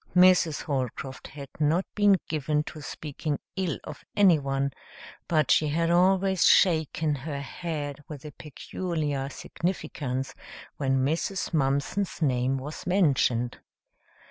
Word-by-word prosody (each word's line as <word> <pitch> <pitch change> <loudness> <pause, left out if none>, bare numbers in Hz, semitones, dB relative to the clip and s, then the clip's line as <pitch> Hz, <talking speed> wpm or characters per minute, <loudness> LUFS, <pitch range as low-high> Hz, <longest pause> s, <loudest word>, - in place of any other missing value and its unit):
Mrs. 180 -4 +5
Holcroft 135 -1 -3
had 140 -1 -9
not 155 +5 +2
been 205 -2 +5
given 150 -1 0
to 155 0 -9
speaking 145 +1 -4 0.2
ill 185 -5 -1
of 150 - -9
anyone, 140 -8 +3 0.6
but 155 -5 +2
she 155 - +4
had 165 +3 +1
always 190 +1 +3
shaken 160 -3 +4
her 140 +1 -4
head 145 -1 -5
with 150 -2 -9
a 150 - -7
peculiar 150 -1 -4
significance 145 -6 -3 0.4
when 135 -2 +1
Mrs. 170 +6 -1
Mumpson's 145 +6 0
name 130 -3 +1
was 145 +6 -7
mentioned. 135 -10 +2
150 Hz, 115 wpm, -27 LUFS, 140-170 Hz, 0.6 s, Mrs